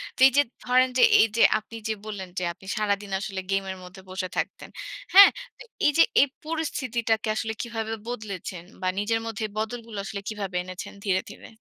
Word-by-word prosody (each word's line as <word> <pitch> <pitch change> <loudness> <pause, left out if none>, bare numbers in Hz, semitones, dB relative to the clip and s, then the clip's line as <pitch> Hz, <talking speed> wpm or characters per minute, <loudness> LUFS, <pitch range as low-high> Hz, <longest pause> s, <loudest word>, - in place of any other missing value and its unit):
তো - - -15
এই - - +2
যে - - +8 0.2
ধরেন 255 +1 +4
যে - - +6 0.2
এই 225 - +6
যে - - +3 0.2
আপনি 225 +2 -13
যে 220 - 0
বললেন 195 -4 -6
যে - - -3
আপনি 190 - -18
সারাদিন 205 -1 -1
আসলে 195 -2 -4
গেমের 195 -1 -1
মধ্যে 185 +1 -12
বসে 185 0 -3
থাকতেন। - - -3 0.4
হ্যাঁ? 400 +1 +11 0.3
তো - - -9 0.2
এই 295 - +6
যে 330 - +9 0.2
এই 285 - +5 0.2
পরিস্থিতিটাকে 245 -9 -1
আসলে 220 0 -2
কিভাবে 225 -2 -4
বদলেছেন 195 -7 -5 0.2
বা 185 - -1
নিজের 225 +2 +1
মধ্যে 225 -1 -3
বদলগুলো 225 0 -4
আসলে 200 -2 -5
কিভাবে 200 -4 -5
এনেছেন 185 0 -8
ধীরে, 185 -2 +1
ধীরে? - - -12
215 Hz, 185 wpm, -26 LUFS, 195-230 Hz, 0.4 s, হ্যাঁ